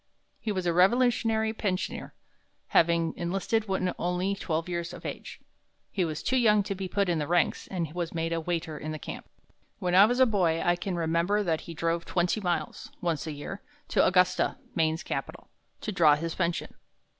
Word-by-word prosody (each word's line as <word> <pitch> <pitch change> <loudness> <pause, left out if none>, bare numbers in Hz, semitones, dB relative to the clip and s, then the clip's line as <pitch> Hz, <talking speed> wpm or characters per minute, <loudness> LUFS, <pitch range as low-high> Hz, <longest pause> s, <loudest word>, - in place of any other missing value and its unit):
He 220 - -2
was 185 -3 -2
a 170 - +2
Revolutionary 220 +3 +3
pensioner, 195 -4 -3 0.5
having 170 0 +3
enlisted 195 +5 -1
when 190 -1 0
only 180 +2 0
twelve 165 -4 -2
years 170 -1 -3
of - - -10
age. - - -6 0.5
He 190 - 0
was 155 -3 -3
too 260 - +1
young 210 -4 +4
to 200 - -3
be 190 0 -4
put 200 +2 0
in 170 -2 +1
the 150 - -2
ranks, 175 0 +1
and 170 -5 -3
was 175 -2 -3
made 165 0 -2
a 165 - -1
waiter 160 -2 -3
in 155 +1 -4
camp. - - -8 0.5
When 180 -1 -1
I 190 +3 +9
was 245 +2 0
a 260 - +8
boy, 180 -8 +2
I 175 - +4
can 180 +1 -3
remember 170 +5 +1
that 165 -4 0
he 165 - -9
drove 165 +1 -1
twenty 180 +4 0
miles, 175 -3 -2
once 165 -3 -2
a - - -2
year, 150 +7 -7 0.3
to - - +3
Augusta, 180 +6 +3 0.2
Maine's 160 0 +1
capital, - - -5 0.3
to 215 - -3
draw 160 -6 +5
his 165 +2 -3
pension. 170 -1 -2
175 Hz, 190 wpm, -28 LUFS, 165-195 Hz, 0.5 s, I